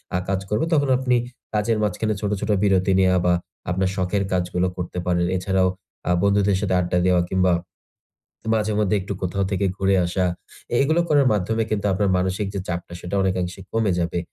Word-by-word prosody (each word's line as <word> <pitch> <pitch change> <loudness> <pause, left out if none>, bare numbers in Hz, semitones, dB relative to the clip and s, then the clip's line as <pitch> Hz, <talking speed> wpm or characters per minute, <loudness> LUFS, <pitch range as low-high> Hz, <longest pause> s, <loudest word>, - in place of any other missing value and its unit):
আ - - +3
কাজ 95 -1 +1
করবে, 105 +8 +1
তখন 145 -3 +2
আপনি 125 -1 +1 0.4
কাজের 105 +1 +1
মাঝখানে 110 +2 0
ছোট, 105 - -1
ছোট 105 - -3
বিরতি 95 -1 +3
নেয়া 95 -1 +4
বা 90 - +4 0.4
আপনার 95 +1 +1
শখের 95 +1 0
কাজগুলো 90 0 0
করতে 90 0 -5
পারেন। 85 -1 +1
এছাড়াও 95 0 +1 0.4
আ - - +3
বন্ধুদের 100 -1 +3
সাথে 95 -3 0
আড্ডা 90 0 0
দেওয়া 90 -1 +4
কিংবা 95 -1 +3 1.0
মাঝে 110 -1 0
মধ্যে 105 -1 +2
একটু 95 +2 -5
কোথাও 95 +2 -1
থেকে 100 0 0
ঘুরে 95 0 +2
আসা। 90 +1 0 0.5
এ - - +3
এগুলো 160 +5 +2
করার 145 -2 +4
মাধ্যমে 110 +3 0
কিন্তু 105 -1 0
আপনার 100 +1 +1
মানসিক 95 +2 -1
যে 100 - -2
চাপটা 85 0 -4
সেটা 90 +2 -5
অনেকাংশে 90 0 -1
কমে 110 -3 +1
যাবে। 85 0 -1
95 Hz, 185 wpm, -23 LUFS, 90-105 Hz, 1.0 s, নেয়া